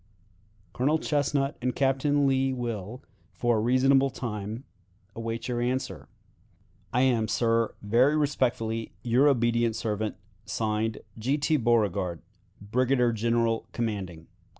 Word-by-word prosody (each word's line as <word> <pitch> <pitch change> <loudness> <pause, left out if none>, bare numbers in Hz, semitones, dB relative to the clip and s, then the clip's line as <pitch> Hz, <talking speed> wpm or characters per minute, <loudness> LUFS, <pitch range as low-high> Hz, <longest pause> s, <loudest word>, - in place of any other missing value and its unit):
"Colonel 145 +5 +2
Chesnut 145 -2 0
and 125 0 -1
Captain 140 +1 +2
Lee 135 -1 +2
will, 120 -2 -5 0.3
for 120 -2 +1
a - - +1
reasonable 135 +3 +4
time, 110 -1 -5 0.5
await 115 0 -4
your 120 -1 -1
answer. 125 +2 -2 0.8
"I 125 - +2
am, 120 -4 +2
sir, 115 +1 +1
very 125 +8 +3
respectfully, 120 -6 -1
your 125 +4 +4
obedient 120 -3 +2
servant, 110 -2 -2 0.3
(Signed) 110 0 -2 0.2
"G. 130 +6 +1
T. 155 +2 +1
Beauregard, 105 - +1 0.4
"Brigadier 125 +4 +1
General 115 0 0
commanding. 95 -8 -4
120 Hz, 115 wpm, -27 LUFS, 110-130 Hz, 0.8 s, reasonable